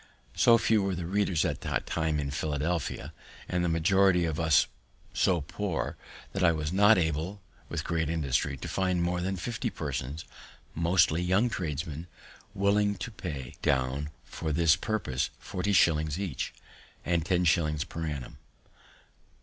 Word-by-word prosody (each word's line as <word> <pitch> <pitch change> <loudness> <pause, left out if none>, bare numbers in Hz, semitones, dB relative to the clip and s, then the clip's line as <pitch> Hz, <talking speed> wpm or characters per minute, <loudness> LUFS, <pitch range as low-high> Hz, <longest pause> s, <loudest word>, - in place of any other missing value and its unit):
So 115 -1 +6
few 110 -2 +3
were 95 -1 -1
the 85 -1 -4
readers 95 -2 +1
at - - -2
that - - -2
time 80 -2 0
in 70 -1 -2
Philadelphia, 75 0 -2 0.3
and 90 -1 0
the 90 - +1
majority 90 +2 +3
of 80 -1 -2
us 80 -4 +4 0.5
so 90 -3 +2
poor, 90 +3 -3 0.4
that 95 - -1
I 85 - +6
was 75 0 -2
not 105 +3 +6
able, 80 +4 -1 0.3
with - - -3
great 80 -2 -1
industry, 70 -3 0
to - - -6
find 90 -2 0
more 90 0 0
than 95 +2 -1
fifty 110 +5 -3
persons, 70 +6 -4 0.5
mostly 85 0 +3
young 95 +7 +2
tradesmen, 80 -1 -4 0.5
willing 100 +1 +2
to 100 +5 -6
pay 70 - -6
down 65 +2 0 0.2
for 80 -2 -4
this 80 +1 +4
purpose 95 - -1
forty 90 +3 -3
shillings 80 -3 +3
each, 90 -11 -3 0.5
and 85 -2 +1
ten 90 +1 +1
shillings 75 -3 +2
per 80 -1 -5
annum. 70 -5 -6
85 Hz, 150 wpm, -29 LUFS, 75-95 Hz, 0.5 s, So